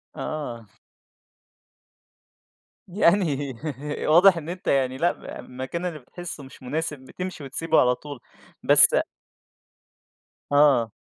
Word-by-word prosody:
آه. 125 -8 -5 2.2
يعني 170 -7 +1 0.5
واضح 175 +3 +6
إن 160 +1 -6
أنت 180 +1 -7
يعني 130 -1 +1
لأ، 175 +4 +2
ب - - -15
المكان 130 +8 -6
اللي 160 -4 -4
بتحسّه 155 +2 -9
مش 130 0 -14
مناسب، 150 +2 -3
بتمشي 180 +4 -7
وتسيبه 160 +4 +1
على 125 0 +3
طول. 145 -3 -10 0.4
بس - - +7 1.6
آه. 140 -6 +4
150 Hz, 105 wpm, -24 LUFS, 130-170 Hz, 2.2 s, بس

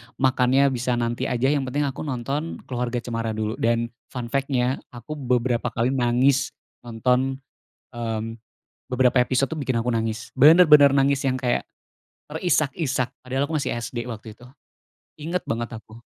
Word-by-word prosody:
makannya 130 +1 +3
bisa 125 -1 -1
nanti 120 0 -1
aja, 125 +3 +1
yang 140 -3 0
penting 145 +3 -1
aku 140 -1 -3
nonton 140 +5 -3
Keluarga 120 -1 -3
Cemara 115 -2 -3
dulu. 110 +1 -3
Dan, 115 0 +1 0.2
fun 120 -2 -6
fact-nya 135 -2 0 0.2
aku 150 +5 -7
beberapa 125 -2 0
kali 120 +3 0
nangis 130 +2 +2 0.4
nonton 125 +3 +1 0.6
mmm, 115 -1 -4 0.5
beberapa 125 0 +3
episode 130 +1 0
tuh 160 - -3
bikin 135 -3 -1
aku 125 - 0
nangis. 115 +1 -2
Bener-bener 150 -2 +7
nangis 140 0 +3
yang 130 - +1
kayak 125 -2 -1 0.6
terisak-isak, 150 -5 0 0.2
padahal 130 +2 -1
aku 160 - 0
masih 140 - -2
SD 120 0 -4
waktu 110 -2 -8
itu. 120 - -14 0.7
Inget 165 +4 -4
banget 115 0 -3
aku. 110 +1 -16
125 Hz, 150 wpm, -24 LUFS, 120-135 Hz, 0.7 s, Bener-bener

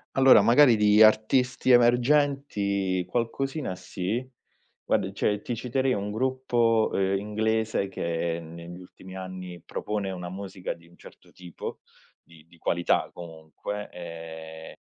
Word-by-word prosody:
Allora, 130 -5 +7
magari 120 +3 +6
di 105 0 +4
artisti 125 +4 +4
emergenti 120 -7 +2
qualcosina 130 -2 -2
sì, 95 +5 -3 0.6
guarda, 95 - 0
cioè, 105 +1 0
ti 120 - -4
citerei 130 +2 0
un 100 +1 -3
gruppo, 120 -2 +1
ehm, 95 0 +1
inglese 110 0 -1
che 85 -2 -3
negli 85 +2 -10
ultimi 95 +1 -13
anni 95 -2 -8
propone 105 -2 -3
una 90 -1 -6
musica 95 0 -6
di 85 - -20
un 85 - -22
certo - - -16
tipo, 90 -2 -8 0.4
di 80 -2 -19
di 85 +1 -22
qualità, 85 +1 0
comunque, 85 +5 -7
ehm, 80 -2 -9
100 Hz, 125 wpm, -26 LUFS, 90-120 Hz, 0.6 s, Allora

